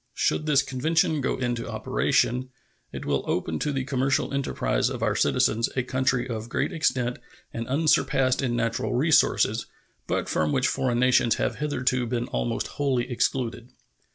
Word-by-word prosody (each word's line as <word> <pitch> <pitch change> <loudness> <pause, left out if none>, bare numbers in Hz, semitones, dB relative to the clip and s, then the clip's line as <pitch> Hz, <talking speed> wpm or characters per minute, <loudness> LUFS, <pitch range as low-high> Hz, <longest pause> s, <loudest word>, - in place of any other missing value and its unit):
Should 155 - 0
this 145 -2 +4
convention 155 +3 +1
go 130 - -1
into 120 -2 -2
operation, 125 +2 0 0.4
it - - -7
will - - 0
open 80 -1 -1
to 150 - -1
the 135 -2 -1
commercial 135 0 0
enterprise 140 -1 0
of - - -4
our - - +1
citizens 115 +2 +2
a 130 - +1
country 130 0 0
of 115 -2 -5
great - - -1
extent 125 -6 0 0.3
and 115 0 -4
unsurpassed 135 -2 +2
in 125 -3 -1
natural 115 -1 -1
resources, 150 +4 +3 0.4
but - - -1
from 75 -1 0
which 130 - +2
foreign 130 -3 0
nations 125 -2 +4
have - - -2
hitherto 130 -4 0
been 120 0 -1
almost 115 -1 -2
wholly 130 -3 -1
excluded. 120 -1 -2
130 Hz, 155 wpm, -25 LUFS, 120-135 Hz, 0.4 s, this